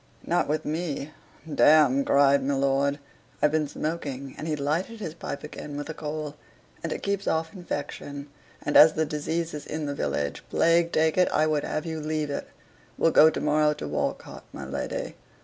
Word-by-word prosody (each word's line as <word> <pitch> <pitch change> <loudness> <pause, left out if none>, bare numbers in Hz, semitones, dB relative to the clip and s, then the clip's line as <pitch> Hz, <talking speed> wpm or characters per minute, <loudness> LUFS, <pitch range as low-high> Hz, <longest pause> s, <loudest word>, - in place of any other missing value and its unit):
"Not - - +1
with 155 +1 -1
me, 155 -2 -3 0.4
damme," 145 -2 +5
cried 140 0 +4
my 140 +1 0
lord. 140 +1 +1 0.4
"I've 150 - +3
been 155 -1 +1
smoking," 140 -3 -4
and 155 - -6
he 155 - 0
lighted 160 +10 -2
his 165 -7 -5
pipe 165 -3 -6
again 150 -1 -7
with 145 +2 -5
a - - -3
coal 150 -1 -5 0.4
"and 165 - -4
it - - -4
keeps 200 0 -1
off 160 +2 0
infection; 145 -5 -6 0.4
and 145 - -2
as 155 +1 +9
the 160 - +1
disease 160 +3 -2
is 150 - -7
in 155 0 -3
the 145 - -2
village 70 - -2
plague 170 0 +3
take 160 +2 +2
it 180 - +4
I 155 - +2
would 155 -2 +1
have 155 - -3
you 160 -1 -3
leave 155 -1 -2
it. - - -4 0.5
We'll 165 - +3
go 155 - +8
to 160 - -3
morrow 150 0 +3
to 75 - -6
Walcote, 75 - -3
my - - -7
lady." - - -4
150 Hz, 190 wpm, -26 LUFS, 145-160 Hz, 0.5 s, as